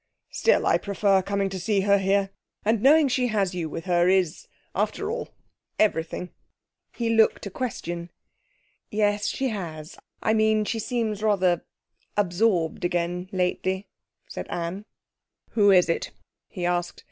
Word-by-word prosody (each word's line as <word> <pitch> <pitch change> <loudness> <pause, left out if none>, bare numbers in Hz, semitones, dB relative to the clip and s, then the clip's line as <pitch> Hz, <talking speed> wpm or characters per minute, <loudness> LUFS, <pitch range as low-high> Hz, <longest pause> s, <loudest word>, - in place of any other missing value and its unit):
'Still, - - +2
I - - +3
prefer 200 -1 +2
coming 200 +1 -1
to 190 0 -5
see 195 +2 +1
her 200 0 +4
here. 195 0 +1 0.3
And 220 0 +2
knowing 295 +3 +6
she 250 -1 +1
has 200 -5 0
you 170 -3 -3
with 165 - -6
her 175 -1 +3
is, 185 -4 +1 0.3
after 215 - -1
all, 475 +1 -4 0.5
everything.' 180 -3 0 0.6
He 230 -1 -1
looked 225 -1 +3
a 200 - -5
question. 175 -7 -4 0.8
'Yes, 205 -1 +1
she 265 -1 -1
has. 165 -6 -6 0.2
I 220 - +3
mean, 215 -1 +3
she 225 - -2
seems 220 -2 -2
rather 190 -5 +2 0.5
absorbed 180 -4 +1
again 175 +1 -1
lately,' 185 +1 -1 0.4
said - - -6
Anne. 175 +4 -4 0.7
'Who 205 -3 +4
is 185 -2 +6
it?' 165 - -1 0.4
he 180 -3 -5
asked. 175 0 -1
195 Hz, 145 wpm, -25 LUFS, 175-215 Hz, 0.8 s, knowing